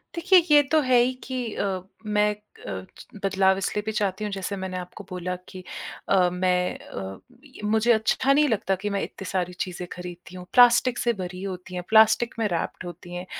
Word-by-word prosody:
देखिए, 365 +2 +6
ये 295 -1 +8
तो 315 - +5
है 255 -2 +4
ही 250 +2 +2
कि 255 -1 -3
अ, 190 -2 -1 0.2
मैं 210 0 +2 0.4
अ, 95 -1 -5
च - - -12 0.2
बदलाव 190 0 +3
इसलिए 195 +2 -1
भी 220 - -1
चाहती 210 -1 -1
हूँ, 210 - -2
जैसे 195 +1 -3
मैंने 190 -1 -4
आपको 180 +3 -8
बोला 180 0 -3
कि 185 -1 -9 0.5
अ, 185 -2 +4
मैं 180 0 +1
अ, 95 0 -7 0.3
य 265 -6 -14
मुझे 220 +3 +3
अच्छा 230 +5 +2
नहीं 300 +1 +4
लगता 200 -3 +1
कि 205 - 0
मैं 200 -1 -1
इतनी 195 - -7
सारी 180 -1 -1
चीज़ें 180 -1 -4
खरीदती 180 0 -9
हूँ, 180 -1 -8
प्लास्टिक 245 0 +6
से 235 - +1
भरी 180 -2 -6
होती 185 -1 -6
हैं, 180 - -3
प्लास्टिक 220 +2 +5
में 225 - +2
रैप्ड 170 +1 -3
होती 175 0 -9
हैं। 180 +1 -5
195 Hz, 200 wpm, -25 LUFS, 180-225 Hz, 0.5 s, ये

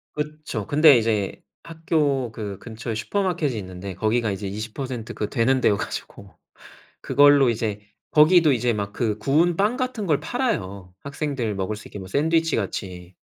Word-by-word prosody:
그쵸. 150 -8 -5
근데 150 -2 +6
이제 110 -4 -1 0.2
학교 150 -6 -1
그 105 -3 -6
근처에 115 0 -6
슈퍼마켓이 170 - -1
있는데 95 -1 -7
거기가 110 +3 0
이제 100 +1 -4
20% 110 +4 -5
그 105 - -3
되는 130 +1 +2
데여 105 - +3
가지고 100 0 -7 0.7
그걸로 145 -2 +5
이제 110 -2 -2 0.3
거기도 155 0 +6
이제 120 -1 +1
막 100 -2 -4
그 110 -2 -1
구운 155 +10 +2
빵 210 +6 +1
같은 255 -5 -3
걸 150 -5 +2
팔아요, 100 - -3
학생들 140 -6 -3
먹을 95 +2 -3
수 110 - -11
있게 - - -9
샌드위치 160 - +1
같이. 90 -3 -5
120 Hz, 305 characters per minute, -23 LUFS, 105-150 Hz, 0.7 s, 근데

